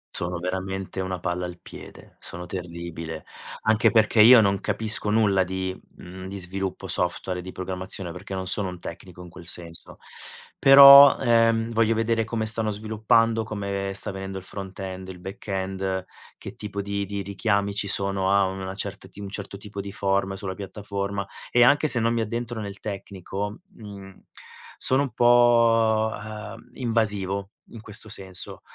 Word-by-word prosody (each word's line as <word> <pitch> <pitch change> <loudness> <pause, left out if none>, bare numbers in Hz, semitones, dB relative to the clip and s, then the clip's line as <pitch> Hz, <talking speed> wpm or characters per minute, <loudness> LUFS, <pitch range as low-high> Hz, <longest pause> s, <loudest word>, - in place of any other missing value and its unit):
Sono 85 0 -2
veramente 95 +1 -4
una 95 -1 -4
palla 90 +1 -3
al 90 0 -8
piede, - - -13
sono 90 +1 -6
terribile, 85 -3 -7 0.4
anche 110 0 +3
perché 110 -1 +4
io 120 +3 +9
non 100 -3 +2
capisco 110 -1 0
nulla 105 -3 +3
di, 95 +1 -4 0.2
mhmm, 95 +1 -10
di 100 +1 -6
sviluppo 95 +1 -4
software 90 +1 0
e - - -5
di 95 - -8
programmazione, 95 -1 -4
perché 95 +2 -9
non 95 -1 -4
sono 95 +1 0
un 90 -1 -9
tecnico 90 +2 -10
in 90 - -10
quel 85 0 -13
senso. 85 -1 -3 0.6
Però, 140 0 +10
ehm, 115 -2 +2
voglio 115 0 +2
vedere 115 0 +1
come 110 0 -3
stanno 110 0 +5
sviluppando, 110 +2 +1
come 100 -2 -4
sta 100 - +1
venendo 95 0 -6
il 95 - -7
front-end, 95 -1 -7
il 90 -1 -9
back-end 95 -1 -4 0.3
che - - -9
tipo 100 -1 -5
di 100 0 -3
di 100 0 -4
richiami 100 0 -1
ci 100 0 -1
sono 100 -1 0
a 100 0 +4
una 95 0 -5
certa 100 -1 -5
ti 100 - -14
un 100 - -6
certo 100 0 -5
tipo 100 0 -7
di 100 0 -8
form 95 0 -1
sulla 95 -1 -5
piattaforma 100 0 -5 0.2
e 120 - +5
anche 145 +4 +4
se 120 - +1
non 115 +1 +1
mi 115 - 0
addentro 115 +1 -4
nel 100 0 -7
tecnico, 100 0 -6 0.2
mhmm, 100 -3 -12 0.5
sono 130 +2 +1
un 135 - -6
po', 115 -2 +4
ehm, 105 +2 -9
invasivo 105 -5 0 0.2
in 115 - -11
questo 105 0 -5
senso. 95 -2 -2
100 Hz, 165 wpm, -24 LUFS, 95-110 Hz, 0.6 s, Però